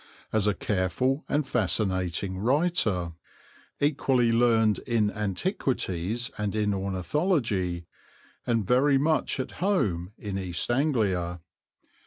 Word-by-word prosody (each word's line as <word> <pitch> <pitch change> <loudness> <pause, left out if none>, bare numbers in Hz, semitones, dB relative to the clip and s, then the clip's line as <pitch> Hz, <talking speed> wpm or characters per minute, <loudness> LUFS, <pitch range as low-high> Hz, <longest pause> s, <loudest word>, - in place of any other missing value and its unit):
as 110 -2 +2
a 105 - +2
careful 110 - 0
and 145 -1 0
fascinating 95 -4 0
writer, 115 - +1 0.7
equally 135 -5 +2
learned 115 -2 +3
in 110 -3 +2
antiquities 105 - -2
and 105 -1 -2
in 105 -1 +1
ornithology, 95 - -1 0.6
and 115 -3 +1
very 135 +5 +4
much 150 0 +1
at 130 - -3
home 100 - 0
in 100 -3 -4
East 90 +4 -2
Anglia. 105 - 0
110 Hz, 105 wpm, -27 LUFS, 95-130 Hz, 0.7 s, very